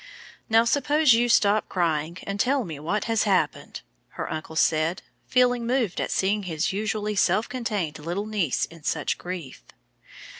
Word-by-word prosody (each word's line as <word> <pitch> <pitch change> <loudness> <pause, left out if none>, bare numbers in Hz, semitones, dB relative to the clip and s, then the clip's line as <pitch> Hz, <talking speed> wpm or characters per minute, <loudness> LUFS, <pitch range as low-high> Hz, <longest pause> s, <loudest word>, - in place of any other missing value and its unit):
"Now 225 +1 +5
suppose 290 +2 +3
you 240 +1 +2
stop 210 -2 +3
crying, 165 -2 -1
and 200 0 -4
tell 260 +3 +2
me 160 -7 -7
what 185 +8 -1
has 225 -2 +1
happened!" 195 -3 0 0.4
her - - -4
uncle 155 0 -6
said, 160 +3 +1 0.2
feeling 245 -2 +2
moved 240 -7 0
at - - -2
seeing 200 +2 +1
his 170 -1 -2
usually 210 +1 -2
self 195 +3 +2
contained 210 -11 -3
little 175 +7 -3
niece 205 -10 0
in 165 -1 -15
such 150 0 -1
grief. 175 -7 -7
200 Hz, 155 wpm, -25 LUFS, 165-230 Hz, 0.4 s, Now